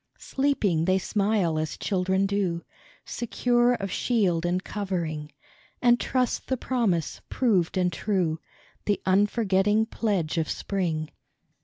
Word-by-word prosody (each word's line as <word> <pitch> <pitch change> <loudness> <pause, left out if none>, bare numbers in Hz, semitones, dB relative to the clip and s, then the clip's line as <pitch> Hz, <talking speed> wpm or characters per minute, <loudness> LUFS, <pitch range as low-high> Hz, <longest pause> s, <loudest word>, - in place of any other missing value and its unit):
Sleeping, 215 - 0
they 185 +1 +3
smile 195 -5 +1
as 155 -2 -3
children 190 0 0
do, 195 -4 -1 0.4
Secure 240 +1 +1
of 195 -4 -4
shield 180 -8 +1
and 180 +2 0
covering, 170 -7 -3 0.5
And 240 -1 +4
trust 255 -2 -1
the 260 - 0
Promise, 220 - -1
proved 195 -9 +1
and 180 -1 +1
true, 175 -5 0 0.5
The 205 -2 +1
unforgetting 205 +1 +2
pledge 195 -8 -1
of 160 - -1
spring. 165 -6 -2
195 Hz, 120 wpm, -26 LUFS, 170-220 Hz, 0.5 s, And